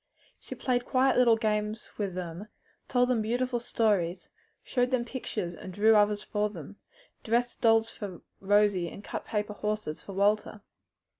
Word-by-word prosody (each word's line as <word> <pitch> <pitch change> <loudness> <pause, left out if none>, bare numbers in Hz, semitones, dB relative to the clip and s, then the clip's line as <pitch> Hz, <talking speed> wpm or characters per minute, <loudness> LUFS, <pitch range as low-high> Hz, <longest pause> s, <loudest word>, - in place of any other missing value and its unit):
She - - -8
played 245 -2 -1
quiet 260 +1 +3
little 240 -2 +5
games 215 0 -1
with 195 -3 -2
them, 180 +2 -6 0.4
told 245 -1 +3
them 245 -3 +1
beautiful 245 +3 0
stories, 195 -7 0 0.3
showed 245 -1 0
them 255 -2 0
pictures 220 -8 -4
and 185 - -9
drew 215 +4 +4
others 210 0 +3
for 210 -1 -1
them, 195 0 -10 0.5
dressed 240 +2 0
dolls 225 0 +4
for 195 -5 -7 0.2
Rosie 200 -3 +3
and 200 - -11
cut - - -5
paper 210 -1 -2
horses 210 -6 -3
for 200 - -9
Walter. 205 +2 +1
210 Hz, 155 wpm, -29 LUFS, 200-235 Hz, 0.5 s, little